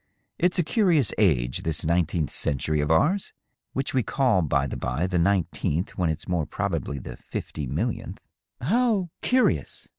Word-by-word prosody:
" - - -46
It's 180 +2 +2
a 175 - +3
curious 170 - +3
age, 65 - +2
this 80 -1 -1
nineteenth 85 -2 +1
century 75 +2 0
of 75 - -1
ours 155 - +2 0.2
— - - -57
which 135 0 -2
we 130 - +3
call, 125 -3 +2
by 70 -3 +1
the 70 - -4
bye, 85 - -1
the 90 -1 0
nineteenth, 85 -2 0
when 90 -3 +1
it's 80 +2 -4
more 85 -4 0
probably 70 - -2
the 65 - -8
fifty 75 -3 -5
millionth." - - -3 0.3
" - - -58
How, 205 - +1
curious 255 0 +1
90 Hz, 175 wpm, -25 LUFS, -, 0.3 s, a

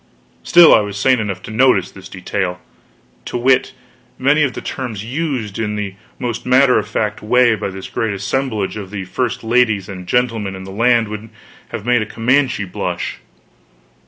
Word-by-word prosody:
Still, 170 -2 +7
I - - +7
was 105 -1 -4
sane 130 +4 +3
enough 95 -4 -4
to - - -8
notice 110 -5 +3
this 95 - -12
detail, 90 -1 -3 0.7
to - - -3
wit: 130 +1 +3 0.5
many 145 +4 +3
of 140 -4 +1
the - - -5
terms 115 -6 -5
used 125 -6 -3
in 105 -1 -2
the 105 -2 -4 0.2
most 120 -3 -3
matter 125 0 +4
of 105 - -5
fact 105 0 -2
way 120 +2 +4
by 105 -2 -3
this 95 0 -8
great 110 -2 -2
assemblage 105 0 -2
of 100 -3 -7
the 100 -1 -5
first 120 +6 -2
ladies 110 -4 +2
and 90 -2 -8
gentlemen 115 -3 0
in 95 - -8
the 95 - -9
land 115 +2 +3
would 105 +1 -7 0.4
have 105 - -6
made 120 -1 +3
a 110 - -3
Comanche 125 -1 +1
blush. 90 - -4
110 Hz, 180 wpm, -18 LUFS, 100-125 Hz, 0.7 s, Still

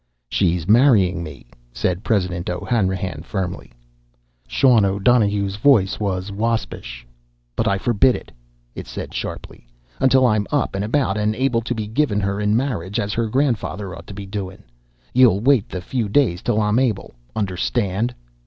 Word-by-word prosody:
"She's 85 -3 0
marryin' 105 -6 +4
me," 75 -4 -9 0.3
said 90 - -2
President 90 -5 -1
O'Hanrahan 95 -4 -1
firmly. 90 0 -5 0.8
Sean 115 - +4
O'Donohue's 100 0 +2
voice 105 -6 +3
was 95 -1 -2
waspish. 105 - -3 0.5
"But - - 0
I 100 - +2
forbid 120 +4 +3
it!" - - -9 0.4
it - - -8
said - - -7
sharply. - - -6 0.3
"Until 130 0 +4
I'm 105 -4 +2
up 145 -3 0
and 100 +1 -2
about 110 -2 0
and 105 +1 0
able 125 -1 +1
to 120 +1 -3
be 110 -1 -3
givin' 110 -1 0
her 100 0 -1
in 105 +1 +2
marriage 110 -6 -2
as 105 -2 -2
her 115 -1 0
grandfather 110 -7 -1
ought 85 0 -12
to 100 - -9
be 100 0 -7
doin'! 95 -1 -6 0.5
Ye'll 120 -6 +5
wait 125 -1 +3
the 90 - -5
few 110 +3 -2
days 105 -7 +2
till 105 - 0
I'm 105 +2 +2
able! 125 -4 -1 0.2
Understand?" 105 +3 -1
105 Hz, 155 wpm, -21 LUFS, 95-120 Hz, 0.8 s, Ye'll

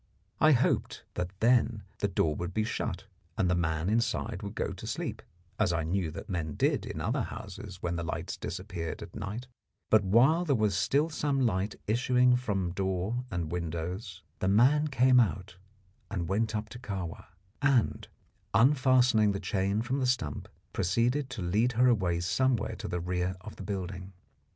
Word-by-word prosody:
I 155 0 +6
hoped 125 - +1
that 90 0 -2
then 115 -2 +3 0.2
the 100 - +1
door 80 -5 +1
would 90 +3 -5
be 110 - +2
shut, 110 - -3 0.3
and 95 - +2
the 90 - +3
man 80 -1 0
inside 115 +3 0
would - - -6
go - - -2
to - - -8
sleep, - - -3 0.4
as 105 -5 +3
I 85 -1 0
knew 85 +1 -1
that 90 - -8
men 85 -7 -3
did - - +1
in - - -5
other - - 0
houses 95 -1 -7
when 85 0 -1
the 85 - -2
lights 85 - -3
disappeared 95 0 -5
at 100 - -12
night; 105 +5 -5 0.5
but 110 -2 +6
while 125 - +4
there 145 -6 +2
was 105 -4 +1
still 140 - +2
some 140 -4 +1
light 100 -1 0
issuing 125 +2 +3
from 100 -8 -1
door 95 +6 -1
and 85 -3 -3
windows 90 +3 -4 0.2
the 95 - 0
man 130 +10 +4
came 130 -2 +5
out 95 -5 0 0.5
and 90 -5 -3
went 110 +4 0
up 105 0 -2
to 120 - -9
Kahwa, 95 -8 -5 0.3
and, 140 -5 +2 0.5
unfastening 125 -3 +4
the 100 - -3
chain 100 +3 0
from 130 +3 -1
the 130 - +1
stump, 80 - -1 0.3
proceeded 120 +9 +1
to 115 -6 -5
lead 110 +8 +2
her 125 +2 +4
away 90 -8 +2
somewhere 120 +4 +1
to - - -5
the 90 - -2
rear 90 +1 -1
of 105 +1 -9
the - - -7
building. 95 -1 -5
105 Hz, 175 wpm, -30 LUFS, 90-125 Hz, 0.5 s, I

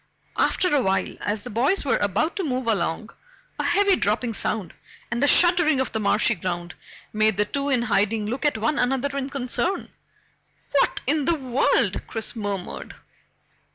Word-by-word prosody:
After 365 -4 +2
a 280 - +3
while, 190 -4 0
as 205 0 -2
the - - -8
boys 270 - +1
were 270 - +2
about 210 - 0
to 390 - -1
move 260 -5 -2
along, 215 -1 -1 0.5
a - - 0
heavy 400 -1 +3
dropping 225 - 0
sound, 210 -3 -1 0.4
and 240 +1 -1
the 285 - +4
shuddering 345 -4 +4
of 265 - -1
the 220 - -2
marshy 215 +2 +2
ground, 175 -2 -4 0.4
made 215 -1 +2
the 210 - +2
two 280 +6 -3
in 250 -4 +2
hiding 210 -1 +1
look 250 +7 -3
at 295 -6 +2
one 280 +7 0
another 270 +2 0
in 275 0 -2
concern. 275 +8 -2 0.8
"What 280 - +2
in 290 +1 +1
the 340 - +2
world?" 260 -3 +1
Chris 225 0 -1
murmured. 200 -4 -5
245 Hz, 170 wpm, -24 LUFS, 210-285 Hz, 0.8 s, the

